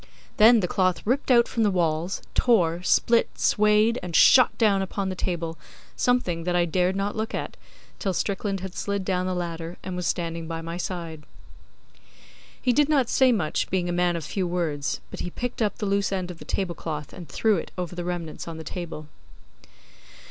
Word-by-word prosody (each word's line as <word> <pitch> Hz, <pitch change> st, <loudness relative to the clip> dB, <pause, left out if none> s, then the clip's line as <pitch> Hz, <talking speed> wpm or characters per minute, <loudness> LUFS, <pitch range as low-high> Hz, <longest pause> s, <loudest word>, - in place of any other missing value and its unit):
Then 225 Hz, +1 st, +7 dB
the 180 Hz, -, 0 dB
cloth 185 Hz, -2 st, 0 dB
ripped 260 Hz, +7 st, 0 dB
out 240 Hz, -2 st, +5 dB
from 230 Hz, -, -2 dB
the 210 Hz, -, +4 dB
walls, 170 Hz, -1 st, -1 dB
tore, 175 Hz, -8 st, +2 dB
split, 230 Hz, +5 st, +2 dB
swayed, 215 Hz, +2 st, +3 dB
and 175 Hz, -2 st, -5 dB
shot 255 Hz, -2 st, +6 dB
down 205 Hz, -4 st, +3 dB
upon 195 Hz, 0 st, -3 dB
the 185 Hz, -, -3 dB
table 170 Hz, -3 st, -3 dB, 0.4 s
something 185 Hz, -10 st, +1 dB
that 175 Hz, +1 st, -1 dB
I 175 Hz, -1 st, +3 dB
dared 180 Hz, +2 st, +1 dB
not 200 Hz, +1 st, -2 dB
look 220 Hz, 0 st, -3 dB
at, -, -, -4 dB, 0.4 s
till 195 Hz, -, -1 dB
Strickland 195 Hz, +1 st, -2 dB
had 190 Hz, -1 st, -6 dB
slid 200 Hz, -1 st, -3 dB
down 185 Hz, -1 st, 0 dB
the 185 Hz, -, -1 dB
ladder 170 Hz, -1 st, -4 dB
and 185 Hz, -, -5 dB
was 180 Hz, -1 st, -2 dB
standing 165 Hz, -1 st, -2 dB
by 165 Hz, 0 st, -4 dB
my 165 Hz, +1 st, -6 dB
side. 170 Hz, -3 st, -5 dB, 1.4 s
He 250 Hz, -, +1 dB
did 295 Hz, +3 st, +3 dB
not 275 Hz, -6 st, +2 dB
say 260 Hz, -1 st, +4 dB
much, 180 Hz, -10 st, 0 dB
being 180 Hz, -2 st, 0 dB
a -, -, -1 dB
man 175 Hz, 0 st, +1 dB
of 165 Hz, -3 st, -4 dB
few 185 Hz, +3 st, -2 dB
words; 165 Hz, -5 st, -2 dB
but -, -, -7 dB
he 180 Hz, -, -3 dB
picked 245 Hz, +6 st, -5 dB
up 210 Hz, -2 st, 0 dB
the 210 Hz, -, -3 dB
loose 200 Hz, 0 st, +1 dB
end 185 Hz, -2 st, -2 dB
of 170 Hz, -, -12 dB
the -, -, -11 dB
tablecloth 160 Hz, -5 st, -4 dB
and 170 Hz, -5 st, -10 dB
threw 220 Hz, -3 st, +2 dB
it -, -, -5 dB
over 180 Hz, -1 st, -4 dB
the 175 Hz, -, -4 dB
remnants 170 Hz, -3 st, -5 dB
on 165 Hz, -1 st, -6 dB
the 160 Hz, -, -7 dB
table. 160 Hz, -2 st, -6 dB
180 Hz, 200 wpm, -25 LUFS, 170-210 Hz, 1.4 s, Then